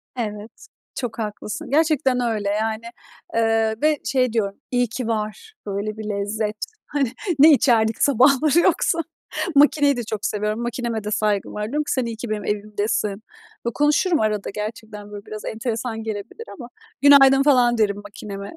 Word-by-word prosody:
Evet, 215 - -6 0.3
çok 240 -4 -4
haklısın, 215 +6 -5
gerçekten 295 -3 +2
öyle. 220 -4 -1
Yani, 220 +2 -1 0.5
eee, 225 -1 +2
ve 305 0 +3
şey 255 -3 +1
diyorum, 200 -4 0 0.2
iyi 245 -1 +2
ki 245 +1 -4
var 220 - -4
böyle 205 +1 -3
bir 215 -1 -5
lezzet. 210 +1 -2 0.3
Hani, 280 -5 -1 0.3
ne 310 +3 +9
içerdik 230 -6 +3
sabahları 280 +4 +4
yoksa? 335 -1 +2 0.6
Makineyi 285 -1 +4
de 240 - -2
çok 215 -1 -4
seviyorum, 210 +2 -1
makineme 235 -2 -3
de 210 - -4
saygım 210 -2 0
var. 210 - -4
Diyorum 295 +6 -1
ki, - - -4
“Sen 260 -2 0
iyi 230 -1 -4
ki 235 +1 -6
benim 215 -1 -3
evimdesin.” 210 0 -2 0.5
Konuşurum 300 +4 +2
arada 215 -2 -1
gerçekten, 210 0 -7
böyle, 205 -1 -9
biraz 215 0 -8
enteresan 225 0 -3
gelebilir 220 - -6
ama. 240 -3 -9 0.3
“Günaydın,” 275 -1 +7
falan 250 -4 +4
derim 205 -2 +1
makineme. 200 -1 -8
225 Hz, 155 wpm, -22 LUFS, 210-265 Hz, 0.6 s, ne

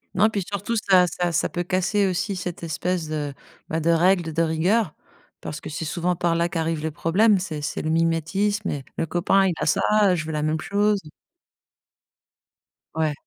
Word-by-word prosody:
Non, 215 +2 +4
puis 200 -3 -2
surtout, 205 +3 -2
ça 190 -4 +4
ça 175 +1 -1
ça 160 - +1
peut 175 - -3
casser 190 +3 +1
aussi 190 +2 -1
cette 180 -2 -5
espèce 170 +1 -2
de, 150 -2 -3 0.4
bah, 160 - -1
de 165 +2 0
règle, 170 0 +3
de 165 - +1
rigueur, 165 +4 +1 0.5
parce 150 - -6
que - - -7
c'est 155 +2 -4
souvent 175 +4 -1
par 170 0 0
là 170 +1 +1
qu'arrive 165 -2 -2
le 160 - -2
problème, 195 +7 +3
c'est 160 -5 -5
c'est 145 - -3
le 155 - -2
mimétisme 165 +6 0
et 140 -2 -4
le - - 0
copain, 185 +4 +2
il 180 - +1
a 155 - -1
ça, - - +2 0.3
heu, 180 - +3
je 155 - -3
veux 160 - -4
la 150 -1 -2
même 155 +1 0
chose. 205 +1 +1 2.0
Ouais. 155 -2 +1
170 Hz, 195 wpm, -23 LUFS, 160-195 Hz, 2.0 s, Non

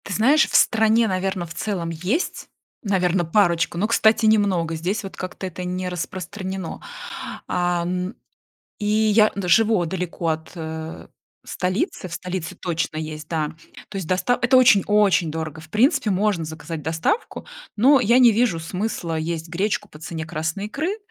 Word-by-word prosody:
Ты 200 - -4
знаешь, 275 +10 +4
в - - -3
стране, 220 +1 +4
наверно, 190 -1 -1
в 165 - -9
целом 175 -1 -3
есть, 180 - -2 0.3
наверно, 185 -3 +1
парочку, 170 -1 +2
но, 205 +4 +1
кстати, 220 -1 +3
немного, 195 -7 +2
здесь 190 +6 -2
вот 195 - -8
как-то 185 +1 -6
это 180 0 -6
не 180 0 -3
распространено. 185 +1 -5 0.7
А 175 -1 0
н 180 +3 -3 0.6
и 205 - -3
я 215 0 +4
н 195 -3 -3
живу 215 0 +4
далеко 175 -1 -3
от, 160 0 -3
э, 160 0 -6 0.4
столицы, 185 - -2
в - - -13
столице 180 -2 -5
точно 165 -2 -2
есть, 155 -1 -6
да. 155 -3 -1 0.4
То 205 - -6
есть 190 -4 -4
доста 190 +7 +1
это 245 +2 +4
очень, 240 -6 +6
очень 195 -6 +3
дорого. 160 -1 -5
В 160 0 -15
принципе, 230 - +3
можно 195 -3 +1
заказать 160 0 -6
доставку, 160 - -2 0.3
но 265 +6 +6
я 235 +3 +4
не 245 -3 +7
вижу 220 -6 +2
смысла 175 -1 -3
есть 165 +1 -3
гречку 205 +4 -1
по 150 - -14
цене 160 0 -5
красной 160 +5 -3
икры. 315 - -2
185 Hz, 160 wpm, -22 LUFS, 165-210 Hz, 0.7 s, не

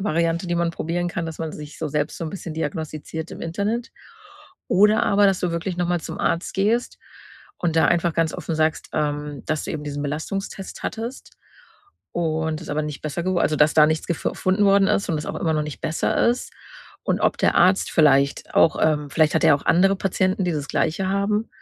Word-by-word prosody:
Variante, 170 -2 0
die 175 - -1
man 170 0 +1
probieren 175 +2 -2
kann, 170 -1 -3
dass 160 -1 -7
man 160 -1 -3
sich 150 -1 -9
so 160 - -3
selbst 150 +5 -2
so 170 - -4
'n 155 - -4
bisschen 175 -3 -6
diagnostiziert 160 0 -5
im - - -9
Internet. 210 +9 -2 0.8
Oder 210 +4 +4
aber, 200 0 +4
dass 195 -2 +2
du 180 - 0
wirklich 170 +2 -3
noch 175 -1 0
mal 175 -1 +1
zum - - -7
Arzt 170 - -1
gehst 220 +5 0 0.6
und 170 -2 -1
da 160 - +5
einfach 170 -1 +2
ganz 165 -1 +1
offen 165 - -4
sagst, 155 0 0
ähm, 145 -2 -2
dass 155 -1 -1
du - - -4
eben 155 - -4
diesen 145 0 -4
Belastungstest 185 +7 -5
hattest 235 +4 -5 0.8
und 160 -1 -1
es - - -10
aber 155 +1 -1
nicht 150 -1 -5
besser 155 +3 -3
gew 185 0 0
also, 155 - +1
dass 150 0 +4
da 150 -1 +7
nichts 155 0 -1
gef 170 - -1
funden 190 +3 +1
worden 195 0 +5
ist 200 - +1
und 160 - 0
es 150 - -6
aber - - -4
immer 160 -2 +1
noch 150 - +1
nicht 150 -1 -7
besser 160 +7 +1
ist. 245 +1 -2 0.5
Und - - 0
ob - - +1
der - - +2
Arzt 185 +2 +4
vielleicht 140 -3 +3
auch 160 - +5
ähm, 150 -2 +2
vielleicht 155 +1 +2
hat 160 - +2
er - - +6
ja - - +7
auch 140 - -12
andere 195 +3 +4
Patienten, 185 0 0
die 175 - 0
das 150 -2 -4
Gleiche 175 +4 0
haben 205 +3 0
165 Hz, 220 wpm, -23 LUFS, 155-190 Hz, 0.8 s, da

